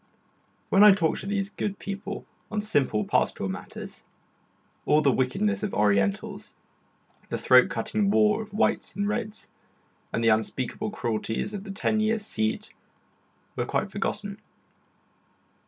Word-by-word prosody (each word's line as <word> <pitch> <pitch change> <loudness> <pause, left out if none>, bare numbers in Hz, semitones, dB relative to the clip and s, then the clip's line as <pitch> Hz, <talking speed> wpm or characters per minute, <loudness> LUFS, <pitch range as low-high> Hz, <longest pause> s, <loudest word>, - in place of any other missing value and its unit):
While 195 - +6
I 210 -1 +10
talked 170 -5 0
to - - -7
these 200 0 -1
good 200 -2 -3
people 200 0 -6 0.2
on 215 - -2
simple 135 - +1
pastoral - - 0
matters, - - -8 0.9
all 150 +1 +4
the 140 - +5
wickedness 200 - 0
of 210 -2 -3
Orientals 100 -2 0 0.7
the - - -2
throat - - +6
cutting 105 -2 0
war 105 - +3
of 215 - -9
Whites 210 -3 0
and 200 +1 -1
Reds, 215 0 -3 0.6
and 115 - -1
the 115 - +5
unspeakable 120 - -1
cruelties 115 - -2
of 200 -2 -5
the - - -9
ten 215 +2 0
years' 215 0 0
siege 110 - -2 0.8
were - - -2
quite - - -1
forgotten. - - -3
195 Hz, 140 wpm, -26 LUFS, -, 0.9 s, I